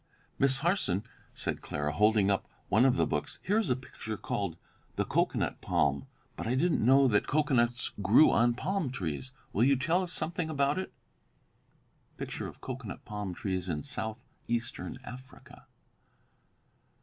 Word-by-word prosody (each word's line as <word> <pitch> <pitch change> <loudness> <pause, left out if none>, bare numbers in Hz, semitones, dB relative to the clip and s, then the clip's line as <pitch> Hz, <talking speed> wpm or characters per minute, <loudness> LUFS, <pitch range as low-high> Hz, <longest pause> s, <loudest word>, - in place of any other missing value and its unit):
"Miss 135 -1 +5
Harson," 170 - +1 0.3
said - - -3
Clara, 75 0 -2
holding 105 +1 +4
up 100 - -1 0.2
one 110 +6 +5
of 130 -1 +4
the - - +3
books, - - -3
"here 205 +3 +2
is 225 - -1
a 125 - +3
picture 115 -4 -7
called 95 -5 -3 0.4
'the - - 0
cocoanut - - 0
palm,' 70 -1 +1 0.3
but - - -5
I 125 - +1
didn't 165 +1 +2
know 135 +3 +6
that 105 -4 +2
cocoanuts 130 -5 +1
grew 105 +10 +6
on 120 0 +3
palm 185 +1 -1
trees. 95 - -4 0.2
Will 110 - +3
you 140 +2 +5
tell 165 +8 +1
us 180 -2 -2
something 165 0 -1
about 140 +1 +1
it?" 190 - -5 1.3
[Illustration: - - -5
COCOANUT - - -7
PALM 105 -4 -4
TREES 95 -2 -2
IN 75 -3 -2
SOUTH 110 +1 -4 0.3
EASTERN 120 +2 -3
AFRICA. 130 +1 -12
125 Hz, 150 wpm, -30 LUFS, 105-140 Hz, 1.3 s, know